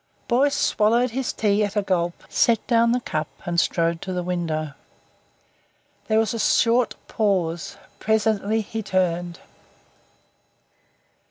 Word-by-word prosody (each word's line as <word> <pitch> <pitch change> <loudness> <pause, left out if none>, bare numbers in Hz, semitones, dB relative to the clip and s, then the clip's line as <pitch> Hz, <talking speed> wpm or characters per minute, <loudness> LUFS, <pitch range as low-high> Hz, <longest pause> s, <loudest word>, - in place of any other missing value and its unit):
Boyce 275 +4 +2
swallowed 235 +4 +2
his 260 +2 -2
tea 210 -1 +1
at 205 0 -3
a 205 - +1
gulp, 175 -3 -1
set 230 -2 +2
down 235 -1 +3
the 245 - +2
cup, 155 -8 -3 0.2
and 170 -1 0
strode 165 -1 0
to 190 - -5
the 180 -1 -2
window. 160 -4 -3 1.3
There 220 - +2
was 220 -1 +1
a 230 - -4
short 230 +2 +2
pause. 180 -6 -1 0.2
Presently 220 0 +1
he 220 +1 -5
turned. 175 -3 -1
205 Hz, 125 wpm, -23 LUFS, 175-225 Hz, 1.3 s, down